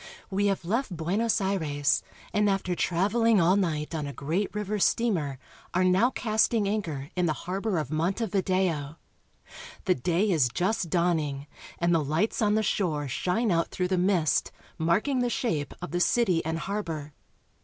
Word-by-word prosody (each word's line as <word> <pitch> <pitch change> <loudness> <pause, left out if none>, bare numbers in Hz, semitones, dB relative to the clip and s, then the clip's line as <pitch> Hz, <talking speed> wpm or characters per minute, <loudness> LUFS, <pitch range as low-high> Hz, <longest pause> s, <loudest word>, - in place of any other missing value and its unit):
We 200 +1 +1
have 195 -3 -1
left 215 -1 -1
Buenos 200 +8 +1
Aires, 160 -8 +1 0.3
and 210 0 +3
after 195 -2 0
traveling 205 +6 +2
all 175 +2 +4
night 160 -6 -1
on 150 -3 -3
a 140 - -6
great 165 +10 -1
river 210 0 -2
steamer 175 - +1 0.4
are 185 - +3
now 185 +6 +4
casting 220 -3 +1
anchor 160 -10 -3
in 180 -1 +1
the 155 - +1
harbor 195 +2 -1
of 150 -3 -3
Montevideo. 185 -3 0 0.9
The 185 - +4
day 175 - +1
is 145 -8 +3
just 180 - 0
dawning, 155 -5 0 0.3
and 175 0 +2
the 165 -2 +2
lights 155 +13 0
on 210 -1 +3
the 220 - +2
shore 160 -8 0
shine 185 - 0
out 165 -1 +2
through 180 -1 -2
the 190 - +2
mist, 180 -4 +2 0.3
mark 170 - +2
ing 270 -3 +1
the 245 0 +1
shape 160 - -1
of 180 - -5
the 175 - -1
city 185 -3 +2
and 160 +1 -2
harbor. 165 -6 -4
180 Hz, 165 wpm, -27 LUFS, 160-205 Hz, 0.9 s, all